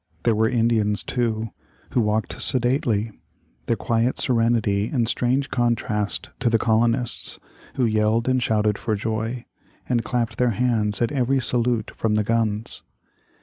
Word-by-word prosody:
There 115 - +3
were 110 +1 +2
Indians, 115 -3 +1
too, 115 -3 -1 0.4
who 125 - +2
walked 105 0 -1
sedately, 120 -4 +1 0.6
their 115 - +2
quiet 115 +3 0
serenity 115 -4 +1
in 120 -5 +1
strange 125 +4 0
contrast 115 -4 -1
to 125 - +2
the 115 - +3
colonists, 115 +2 +1 0.4
who 130 - +1
yelled 110 +1 +1
and 130 0 +2
shouted 105 -3 +1
for 110 - -1
joy, 115 +3 -3 0.4
and 120 -2 +1
clapped 115 -1 -2
their 125 -1 +3
hands 115 -3 +1
at 120 - 0
every 135 -1 +1
salute 120 -2 0
from 110 -1 0
the 105 - +2
guns. 110 -1 -1
115 Hz, 145 wpm, -23 LUFS, 110-120 Hz, 0.6 s, There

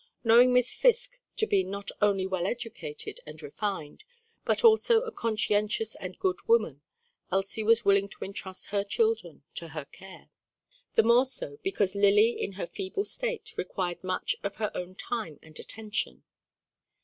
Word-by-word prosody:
Knowing 240 +2 +7
Miss 250 0 +3
Fisk - - +2 0.2
to 435 - +3
be 195 - +2
not 200 +2 -5
only 200 -2 +3
well 185 -1 -1
educated 220 -10 -6
and 155 +1 -9
refined, 160 - -4 0.4
but - - +1
also 455 0 +6
a 470 -2 -5
conscientious 215 - 0
and - - -8
good 375 -2 0
woman, 465 +1 +2 0.5
Elsie 195 +3 0
was 225 +1 +3
willing 200 0 +4
to - - -7
entrust 190 -1 -7
her 200 -1 +1
children 205 -7 -1
to 170 - -6
her 155 -3 -6
care; 190 +6 -14 0.6
the 225 - +6
more 240 +3 +5
so, 145 - -4
because 195 0 0
Lily 205 +3 +5
in 200 - -4
her 190 - -3
feeble 390 - -4
state, 480 -3 -2
required 180 -1 -3
much 185 0 -1
of 200 0 -4
her 215 -1 -2
own 180 +1 -6
time 210 -9 -4
and 155 -1 -13
attention. 220 0 -4
205 Hz, 160 wpm, -28 LUFS, 190-240 Hz, 0.6 s, Knowing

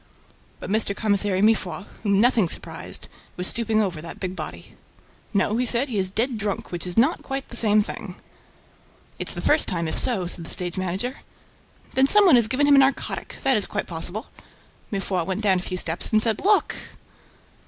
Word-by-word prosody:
But - - -7
Mr. 210 -2 +2
Commissary 200 -2 +1
Mifroid, 200 -5 +1 0.2
whom 200 -2 +1
nothing 225 -5 +3
surprised, - - -3 0.3
was 180 - -2
stooping 220 0 +2
over 175 -6 -4
that 165 - -8
big 185 -1 -4
body. 150 - -7 0.6
"No," 200 +2 +1
he 250 - 0
said, 250 +4 +2
"he 215 -5 -1
is 190 -1 +1
dead 230 +4 -1
drunk, 205 -2 -4
which 175 0 -3
is 175 - -6
not 265 +9 +3
quite 270 0 -5
the - - -8
same 215 -2 +3
thing." 195 -3 -8 1.0
"It's - - -4
the - - -4
first 305 +1 +3
time, 170 -2 -2
if - - 0
so," 225 -8 +1
said 175 0 -3
the - - -7
stage 175 -1 -1
manager 190 +8 -3 0.8
"Then 265 +1 +3
some 415 +6 +7
one 350 - +7
has 235 -3 +5
given 260 +5 +1
him 285 - +5
a - - +8
narcotic. 270 0 0
That 270 -3 +3
is 205 - -1
quite - - -3
possible." 175 +7 -1 0.6
Mifroid 195 -3 -2
went 190 +2 -2
down 195 -3 +2
a - - -6
few 185 0 -4
steps 165 -1 0
and 215 - +4
said: 220 -1 +1
"Look!" 415 +1 +3
205 Hz, 195 wpm, -23 LUFS, 185-235 Hz, 1.0 s, a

